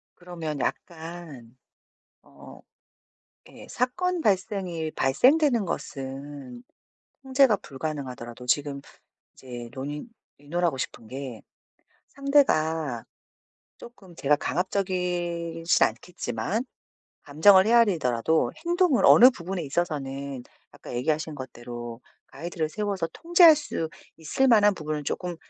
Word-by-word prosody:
그러면 165 -4 -6
약간 160 -6 -6 0.7
어 70 0 -15 0.9
예 - - -13
사건 360 +9 -1
발생이 185 - -1
발생되는 245 - +3
것은 135 -5 -6 0.6
통제가 265 -4 +4
불가능하더라도 130 -6 -7
지금 140 +2 0 0.5
이제 120 -2 -9
논의 145 +3 -6 0.3
의논하고 165 +1 -1
싶은 115 -3 -6
게 130 -3 -7 0.7
상대가 160 - +1 0.8
쪼끔 195 -7 -14
제가 150 -1 +2
강압적이지는 175 -2 0
않겠지만 175 - -4 0.6
감정을 190 +7 +5
헤아리더라도 160 - +3 0.2
행동을 345 -6 +2
어느 250 +2 +9
부분에 185 -5 -5
있어서는 140 -4 -3 0.3
아까 - - -11
얘기하신 150 +5 -1
것대로 120 -2 -8 0.3
가이드를 160 +2 -4
세워서 195 +1 -2
통제할 340 -1 +6
수 295 - -4 0.3
있을 165 +12 0
만한 210 -4 +5
부분을 155 -3 -4
쪼금 175 +4 -3
160 Hz, 255 characters per minute, -26 LUFS, 135-200 Hz, 0.9 s, 어느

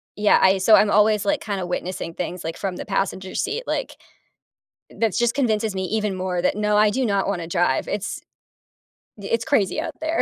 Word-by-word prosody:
yeah, 210 0 +4
I 190 0 +4
so 215 +3 +6
I'm 210 - +4
always, 210 0 +3
like, 295 -1 +1
kinda 195 -3 -3
witnessing 175 -1 -4
things, 180 +1 -5
like, 165 +1 -4
from 190 -2 -3
the - - -6
passenger 190 -2 -2
seat, 440 +3 -2
like, - - -3 0.9
that's 225 -4 -1
just 240 -1 +2
convinces 220 -6 0
me 190 - -2
even 210 -1 -1
more 185 -1 -2
that, 185 - +1
no, 210 0 +1
I 210 0 +5
do 255 +4 0
not 200 -2 0
wanna 175 -4 -2
drive. 170 -6 0
It's 210 +2 -4 1.0
it's 225 +3 -2
crazy 200 +8 +1
out 325 -3 -5
there. 315 +1 0
205 Hz, 195 wpm, -22 LUFS, 185-220 Hz, 1.0 s, so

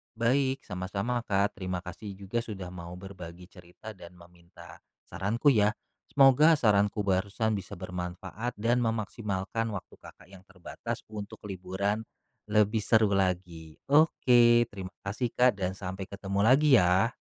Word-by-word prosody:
Baik, 130 +3 +1
sama-sama, 100 +7 -3
Kak. 100 +1 0
Terima 90 -1 -4
kasih 100 +3 -8
juga 100 +4 -3
sudah 100 -6 -6
mau 85 -1 -8
berbagi 90 -2 -10
cerita 90 +4 -12
dan 90 -3 -13
meminta 85 -1 -16 0.2
saranku 115 +9 +1
ya. 105 -3 +3 0.3
Semoga 140 +4 +6
saranku 105 -5 +2
barusan 100 +3 0
bisa 100 +1 -8
bermanfaat 90 +5 -6
dan 115 +4 +1
memaksimalkan 110 -2 -2
waktu 95 - -8
Kakak - - -15
yang 95 -2 -13
terbatas 90 -3 -7
untuk 105 -1 -8
liburan 100 +2 -3 0.4
lebih 105 +1 +2
seru 110 -1 +3
lagi. 90 -4 -2 0.2
Oke, 120 -6 +5
terima 95 -1 -8
kasih 105 +5 -2
Kak 125 +1 +5
dan 95 0 -2
sampai 95 0 -6
ketemu 100 0 -4
lagi 135 +6 +5
ya. 90 +6 +3
100 Hz, 135 wpm, -28 LUFS, 90-115 Hz, 0.4 s, Semoga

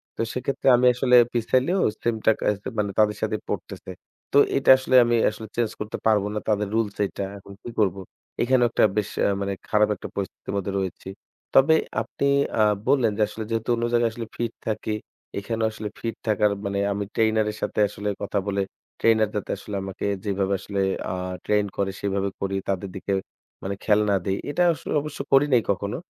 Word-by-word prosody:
তো - - -3
সেক্ষেত্রে 130 +2 -2
আমি 125 +1 +3
আসলে 125 0 +3 0.2
পিছাইলেও 130 - +1 0.2
সেম 120 -1 +1
টাকা 110 - +3
আস 105 - -3 0.2
মানে 100 -1 0
তাদের 105 0 +3
সাথেই 110 -1 -1
পড়তেসে। - - -5 0.4
তো 140 - +5 0.2
এটা 135 - +1
আসলে 130 0 0
আমি 120 0 +2
আসলে 110 +1 -8
চেঞ্জ 115 -2 0
করতে 105 +1 -4
পারব 110 -2 +4
না। 105 - -1
তাদের 105 -1 +1
রুলস 110 -3 0
এইটা। 100 - -5
এখন 100 0 -12
কী - - -6
করব? 95 -4 +2 0.5
এখানেও 125 0 +4
একটা - - +2
বেশ 105 - 0
অ্যা - - +3
মানে 100 0 -1 0.2
খারাপ 105 0 +3
একটা - - -8
পরিস্থিতির 100 0 -5
মধ্যে 100 0 -2
রয়েছি। 95 0 -5 0.5
তবে 145 +4 +7 0.3
আপনি 140 - -2 0.3
আ - - +6 0.2
বললেন 125 -6 +3
যে - - 0
আসলে 110 - -6
যেহেতু 115 0 -2
অন্য 115 - -3
জায়গায় 120 -1 +3
আসলে 115 -1 -6
ফিট 120 -1 -2
থাকি, 110 0 -1 0.4
এখানেও 110 +2 -1
আসলে 110 -1 -6
ফিট 115 -1 -3
থাকার 105 -1 +3
মানে 100 0 -1
আমি 100 +1 -1
ট্রেইনারের 110 -1 +1
সাথে 105 - -2
আসলে 105 +1 -4
কথা 100 0 -1
বলে 100 0 0 0.4
ট্রেইনার 110 -2 +3
যাতে 105 - -3
আসলে 105 - -7
আমাকে 95 0 -5 0.2
যেইভাবে 100 -1 0
আসলে 100 +1 -4 0.3
আ - - -2 0.3
ট্রেইন 105 -1 +2
করে, 100 -1 0
সেভাবে 100 0 -1
করি। 100 0 -1
তাদের 95 0 -1
দিকে 95 +1 -4 0.5
মানে 100 +1 -3
খেয়াল 105 -1 +4
না 100 - +3
দেই। 95 0 0
এটা 165 +5 +1
আসলে - - -6
অবশ্য 150 0 -7
করি 135 +1 +7
নাই 120 - +6
কখনো। 100 +1 -3
105 Hz, 190 wpm, -24 LUFS, 100-115 Hz, 0.5 s, তবে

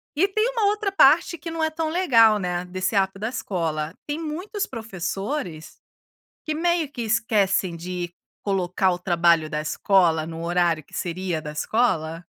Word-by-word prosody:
E 375 +6 +3
tem 430 +4 +1
uma 460 -4 0
outra 415 -1 +1
parte 335 0 +5
que 330 +3 -7
não 325 -1 -2
é 315 - +2
tão 315 0 -2
legal, 230 - +5
né, 180 -2 -2
desse 185 +3 -2
app 195 0 +1
da 220 +3 -3
escola. 165 -8 -3
Tem 295 +2 -3
muitos 365 +7 -4
professores, 195 - -5 0.7
que 310 - -1
meio 335 -2 0
que 245 - -6
esquecem 210 -5 +1
de 175 0 -5 0.3
colocar 190 -1 +1
o 175 - -3
trabalho 170 -3 +3
da 150 - -2
escola 165 -1 +2
no 165 0 -6
horário 170 -3 +1
que - - -26
seria 175 -2 -3
da 150 - -6
escola, 165 -2 0
195 Hz, 165 wpm, -24 LUFS, -, 0.7 s, parte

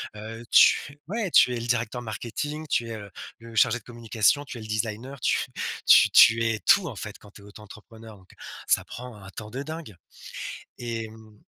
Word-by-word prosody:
heu, 115 +2 -8
tu - - +7
f - - -9 0.2
ouais! 215 -3 -2
Tu 125 - +6
es 120 - -3
le 120 - -5
directeur 120 0 -1
marketing, 125 +7 -5
tu 115 - 0
es, 115 - -4
heu, 100 -1 -9 0.3
le 115 0 -12
chargé 120 +3 +3
de - - -26
communication, 120 +4 0
tu 125 - -8
es - - -8
le 110 - -9
designer, 115 +5 -4
tu - - +1 0.2
f - - -4
tu - - +7
tu 115 +1 +7
es 110 -1 0
tout, 195 -4 +4
en 120 - -6
fait, 105 0 -8
quand 105 - -17
tu 105 - -15
es 100 - -15
auto-entrepreneur, 110 +1 -13
donc 95 - -22 0.4
ça - - +2
prend 125 -1 -9
un 95 -1 -12
temps 105 -1 -9
de 135 +4 -5
dingue. 155 - -8 0.8
Et 115 -2 -4
mmh 110 -1 -16
115 Hz, 215 wpm, -26 LUFS, 110-125 Hz, 0.8 s, tu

